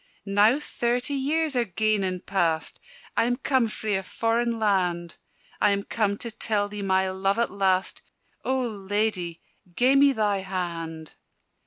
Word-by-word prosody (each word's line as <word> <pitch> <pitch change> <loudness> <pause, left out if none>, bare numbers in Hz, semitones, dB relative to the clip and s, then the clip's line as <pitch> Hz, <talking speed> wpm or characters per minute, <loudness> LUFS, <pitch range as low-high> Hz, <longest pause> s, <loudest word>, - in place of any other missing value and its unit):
"Now 210 +6 +4
thirty 245 -1 -1
years 295 +2 0
are 245 - +3
gane 215 0 0
and 185 -1 -3
past, 165 -5 0 0.4
I - - +3
am 245 +1 +1
come 260 -2 +1
frae 215 -1 -3
a - - -2
foreign 230 +4 0
land: 180 -5 0 0.4
I 210 - +5
am 200 0 0
come 200 -2 0
to 235 - -3
tell 215 -2 0
thee 205 0 -6
my 190 -1 +1
love 195 +2 0
at 235 - +1
last 190 -1 0 0.4
O 260 0 0
Ladye, 205 -5 -2 0.3
gie 255 +2 +4
me 280 0 +6
thy 210 -5 +1
hand!" 170 -4 -5
205 Hz, 155 wpm, -26 LUFS, 190-235 Hz, 0.4 s, me